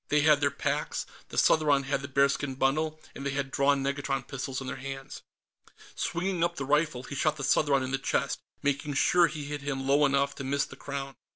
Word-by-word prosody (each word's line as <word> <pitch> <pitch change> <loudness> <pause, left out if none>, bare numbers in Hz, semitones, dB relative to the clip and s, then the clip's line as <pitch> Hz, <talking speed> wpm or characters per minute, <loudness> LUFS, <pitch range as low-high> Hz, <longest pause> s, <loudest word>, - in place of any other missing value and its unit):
They 150 0 +3
had 150 -1 +5
their 140 - +3
packs, - - -2 0.2
the - - -8
Southron 145 -3 +4
had 135 0 -1
the 140 - -5
bearskin 140 0 +1
bundle, 155 +4 0
and 140 - -8
they 140 - -1
had 135 -1 -2
drawn 140 0 +2
negatron 140 0 -1
pistols 135 -1 -4
in 135 - -6
their - - -4
hands. 135 0 -7 0.7
Swinging 175 0 -1
up 170 0 +1
the 135 - -4
rifle, 150 -2 +1
he 135 - -8
shot 155 +2 +1
the 135 - -5
Southron 140 0 +3
in 130 - -4
the 135 - 0
chest, - - -1 0.2
making 145 +1 -1
sure 175 +5 +5
he 155 -3 -6
hit 145 0 -5
him 135 -1 -3
low 140 +2 +4
enough 140 0 +1
to 140 - -5
miss 140 +2 0
the - - -12
Crown. 140 -1 -5
140 Hz, 215 wpm, -29 LUFS, 135-150 Hz, 0.7 s, had